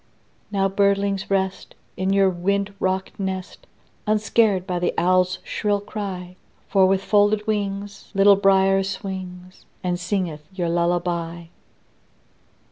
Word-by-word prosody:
Now, 195 -1 +2
birdlings, 200 0 +1
rest, 190 -1 -1 0.2
In 190 +1 -1
your 195 0 +4
wind 200 +3 -1
rocked 190 +1 -2
nest, 190 -1 -5 0.4
Unscared 215 -2 +2
by 180 -1 -2
the 175 - -1
owl's 185 +1 +2
shrill 205 -1 -1
cry; 190 -3 -6 0.3
For 195 -1 +4
with 195 0 +1
folded 210 +1 +3
wings 200 -1 -3
Little 200 +1 +7
Brier 195 0 +4
swings, 185 -1 -6 0.2
And 180 -1 -1
singeth 180 -4 -2
your 180 -3 -2
lullaby. 170 0 -1
190 Hz, 120 wpm, -23 LUFS, 180-200 Hz, 0.4 s, Little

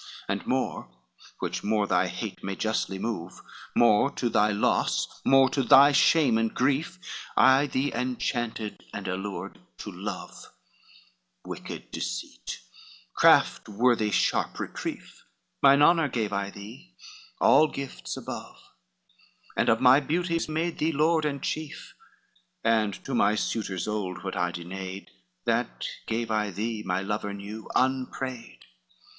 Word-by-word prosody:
XLV - - -15 0.2
"And - - -2
more, - - -1 0.5
which - - -3
more 105 0 +1
thy 90 -1 +2
hate 105 +2 -6
may 95 0 -3
justly 110 -3 -1
move, 95 -5 -4 0.4
More 120 +2 +5
to 125 -4 -2
thy 110 -2 +3
loss, 100 - 0
more 135 0 +6
to 140 - +1
thy 135 +3 +7
shame 140 -4 +4
and 115 0 0
grief, 145 +7 0 0.4
I 135 +2 +6
thee 135 +1 -1
inchanted, 120 -3 -3
and - - -5
allured 95 -4 -5 0.2
to - - -7
love, - - -7 1.0
Wicked - - -8
deceit, - - -5 0.5
craft - - +4
worthy 110 0 +2
sharp - - +1
reprief; - - -6 0.4
Mine 140 +1 +6
honor 165 -1 +5
gave 110 -5 -2
I 100 0 -1
thee 115 - -12 0.4
all 155 - +6
gifts 140 -2 -6
above, - - -7 1.0
And - - +2
of 115 +1 +3
my 130 +2 +7
beauties 165 +3 -1
made 165 +2 -2
thee 160 +2 +1
lord 155 +1 +2
and 140 -2 -2
chief, 155 -1 -5 0.7
And 110 -3 +2
to 135 - -4
my 105 -3 +3
suitors 100 -4 -2
old 100 -4 -3
what 95 - -4
I 90 -2 0
denayed, 95 +2 -7 0.4
That - - -1 0.2
gave 115 0 -2
I 105 -1 +1
thee, 110 +3 -3
my 95 -1 -1
lover 100 0 -3
new, 105 +2 -8
unprayed. 130 -1 -2
115 Hz, 135 wpm, -27 LUFS, 100-135 Hz, 1.0 s, thy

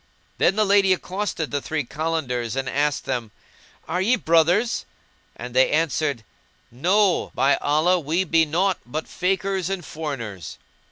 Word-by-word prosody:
Then - - +3
the 215 0 +2
lady 195 -1 +4
accosted 185 -3 -3
the 145 - -1
three 155 0 -2
Kalandars 130 -5 -2
and 135 -1 -2
asked 145 +2 0
them, 120 -3 -3 0.6
"Are 180 +2 -1
ye 230 +7 +3
brothers?"; 175 +4 +2 0.5
when - - -8
they - - +4
answered, 145 - 0 0.5
"No, 180 - +2
by 140 +1 +3
Allah, 160 +5 +2
we 165 +4 0
be 165 -2 +3
naught 180 +5 0
but 155 +6 -5
Fakirs 190 0 -1
and 190 -4 -4
foreigners." 125 - -6
165 Hz, 145 wpm, -23 LUFS, 145-190 Hz, 0.6 s, lady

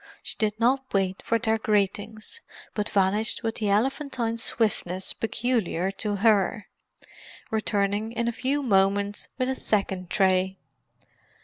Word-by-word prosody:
She - - +1
did 215 -1 0
not 260 +3 +1
wait 190 -1 0
for 230 - +1
their 225 -1 0
greetings, 215 - -1 0.3
but 210 -1 -2
vanished 205 +2 +3
with 225 0 -2
the 210 -2 -1
elephantine 235 +1 0
swiftness 190 -5 -1
peculiar 220 -5 -1
to 205 +1 -2
her; 205 0 +2 0.8
returning 210 0 0
in 235 0 -2
a - - +2
few 265 +5 -1
moments 200 -2 +1
with 255 -1 0
a 265 - 0
second 190 -6 -1
tray. 190 -1 +2
215 Hz, 130 wpm, -26 LUFS, 195-230 Hz, 0.8 s, vanished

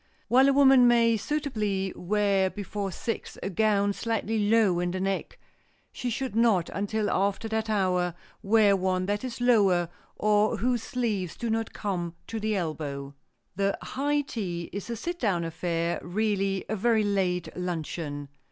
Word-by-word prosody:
While 260 +3 +6
a - - +4
woman 270 -3 +6
may 230 -1 +4
suitably 215 -7 -2
wear 200 0 +1
before 205 0 -4
six 230 +5 -5
a 195 - -2
gown 205 +1 +2
slightly 225 -1 -1
low 215 -6 +4
in 175 0 0
the 185 +1 -3
neck, 195 0 -2 0.6
she 250 - -3
should 255 0 -3
not 225 -7 +3
until 205 +2 -1
after 200 +3 0
that 220 0 -1
hour 180 -4 +1 0.3
wear 205 -1 +4
one 185 -1 0
that 205 +3 -1
is 250 -2 -5
lower 200 -8 +3 0.3
or 210 +1 +2
whose 240 +2 0
sleeves 215 -10 -2
do 235 -2 -2
not 225 0 -1
come 175 -5 -3
to 225 - -4
the 215 0 -1
elbow. 145 -5 -4 0.4
The 200 +1 0
"high 290 +2 -1
tea" 180 -11 -5
is 200 +3 -5
a 235 - -2
sit 345 +10 -4
down 190 -7 +1
affair, 170 0 -2
really 195 0 -1
a 215 - -1
very 220 +1 +2
late 185 -4 -1
luncheon. 160 -4 -4
205 Hz, 160 wpm, -27 LUFS, 185-225 Hz, 0.6 s, While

